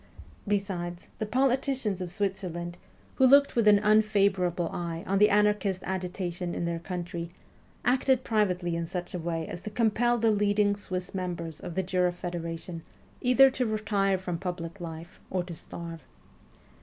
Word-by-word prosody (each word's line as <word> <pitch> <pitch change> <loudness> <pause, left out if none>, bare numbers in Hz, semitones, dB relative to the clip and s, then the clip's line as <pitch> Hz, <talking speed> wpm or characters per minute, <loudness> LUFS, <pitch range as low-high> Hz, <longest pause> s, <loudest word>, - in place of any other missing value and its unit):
Besides, 185 -4 -2
the 215 - -2
politicians 255 -4 +1
of 180 -1 -4
Switzerland, 185 -4 -3 0.4
who 260 - +6
looked 280 +2 +6
with 230 -3 +3
an 205 -1 +8
unfavourable 200 -5 +3
eye 170 -1 -4
on 195 +1 +1
the 210 - +6
anarchist 205 -2 +2
agitation 180 -1 -3
in 170 - -2
their 170 0 -2
country, 175 -1 -5 0.6
acted 255 +1 +3
privately 180 -6 +1
in 170 0 -2
such 180 0 -5
a 180 - -3
way 165 -1 -3
as 175 - -6
to 215 - -5
compel 235 +2 +2
the 225 -1 +3
leading 205 0 +2
Swiss 185 -3 -5
members 175 -4 -4
of 175 -2 -7
the 190 - +1
Jura 180 -1 +1
Federation 170 -1 -5 0.4
either 260 +2 +6
to 255 -2 -1
retire 205 -3 +1
from 180 -2 -4
public 180 0 -5
life 165 +1 -8
or 185 -1 -1
to 175 -1 -8
starve. 165 0 -8
185 Hz, 155 wpm, -28 LUFS, 175-210 Hz, 0.6 s, an